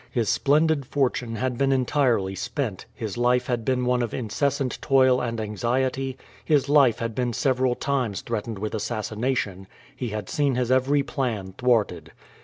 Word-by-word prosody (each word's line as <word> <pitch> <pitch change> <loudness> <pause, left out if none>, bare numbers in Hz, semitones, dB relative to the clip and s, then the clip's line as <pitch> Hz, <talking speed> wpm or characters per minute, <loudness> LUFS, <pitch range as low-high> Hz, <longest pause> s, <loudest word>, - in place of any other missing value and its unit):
His 115 -4 0
splendid 150 -1 +2
fortune 125 -4 -1
had 125 +1 -2
been 135 0 +3
entirely 125 -7 +1
spent, 115 -1 -4
his 110 0 -5
life 125 +1 +3
had 120 -2 -1
been 125 +1 0
one 125 0 +2
of 120 -3 -2
incessant 135 +3 -1
toil 130 -2 +4
and 115 -2 -3
anxiety, 130 +5 -1 0.3
his 145 -3 +2
life 140 -5 +5
had 115 -1 -3
been 120 0 -1
several 130 -1 +1
times 130 -9 -1
threatened 115 -1 -4
with 105 +2 -4
assassination, 110 -3 -2 0.3
he 125 -2 -4
had 105 -3 -5
seen 140 -3 +1
his 125 0 0
every 135 +2 +3
plan 110 -10 -3
thwarted. 120 -3 0
125 Hz, 160 wpm, -25 LUFS, 115-135 Hz, 0.3 s, life